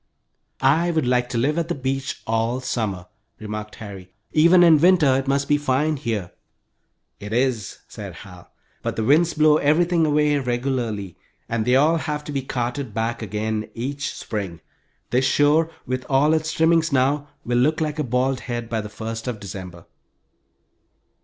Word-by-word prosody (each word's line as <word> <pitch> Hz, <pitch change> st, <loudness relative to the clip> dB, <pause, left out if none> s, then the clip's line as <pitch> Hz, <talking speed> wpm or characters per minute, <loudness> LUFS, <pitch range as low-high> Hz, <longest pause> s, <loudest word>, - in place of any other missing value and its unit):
"I 160 Hz, +6 st, +3 dB
would 160 Hz, -5 st, 0 dB
like 125 Hz, 0 st, +1 dB
to 125 Hz, -, -2 dB
live 145 Hz, +7 st, +1 dB
at 165 Hz, -, -2 dB
the 175 Hz, -, -2 dB
beach 135 Hz, 0 st, -3 dB
all 115 Hz, +3 st, 0 dB
summer," 105 Hz, -8 st, -3 dB, 0.3 s
remarked 105 Hz, 0 st, -6 dB
Harry. 100 Hz, -4 st, -10 dB, 0.2 s
"Even 170 Hz, +3 st, +6 dB
in 165 Hz, -3 st, +7 dB
winter 165 Hz, -5 st, +5 dB
it 135 Hz, +1 st, -1 dB
must 140 Hz, +1 st, +1 dB
be 145 Hz, 0 st, +3 dB
fine 145 Hz, +2 st, +1 dB
here." 110 Hz, -10 st, -3 dB, 0.9 s
"It 105 Hz, 0 st, -8 dB
is," 120 Hz, -3 st, 0 dB
said -, -, -8 dB
Hal. -, -, -14 dB, 0.3 s
"But -, -, -3 dB
the 110 Hz, -, -1 dB
winds 160 Hz, +7 st, +3 dB
blow 155 Hz, -1 st, +5 dB
everything 165 Hz, +2 st, +2 dB
away 150 Hz, -1 st, +2 dB
regularly, 120 Hz, -7 st, -2 dB, 0.3 s
and 115 Hz, -2 st, -1 dB
they 125 Hz, +1 st, +3 dB
all 155 Hz, +5 st, +4 dB
have 150 Hz, -1 st, -3 dB
to 150 Hz, -, -7 dB
be 140 Hz, -1 st, -1 dB
carted 125 Hz, -2 st, -4 dB
back 115 Hz, +1 st, -2 dB
again 110 Hz, 0 st, -3 dB
each 140 Hz, +4 st, -4 dB
spring. 95 Hz, -6 st, -5 dB, 0.5 s
This 130 Hz, +2 st, +2 dB
shore, 150 Hz, +4 st, +3 dB, 0.2 s
with 130 Hz, 0 st, -3 dB
all 145 Hz, +3 st, +4 dB
its 160 Hz, 0 st, 0 dB
trimmings 165 Hz, 0 st, +2 dB
now, 140 Hz, +2 st, +1 dB, 0.2 s
will 120 Hz, 0 st, +1 dB
look 155 Hz, +5 st, +2 dB
like 155 Hz, -1 st, -2 dB
a -, -, +1 dB
bald 130 Hz, +1 st, 0 dB
head 120 Hz, -2 st, -5 dB
by 110 Hz, -1 st, 0 dB
the 105 Hz, -, -8 dB
first 115 Hz, +2 st, -6 dB
of 120 Hz, -4 st, -3 dB
December." 95 Hz, -4 st, -8 dB
130 Hz, 170 wpm, -22 LUFS, 115-150 Hz, 0.9 s, in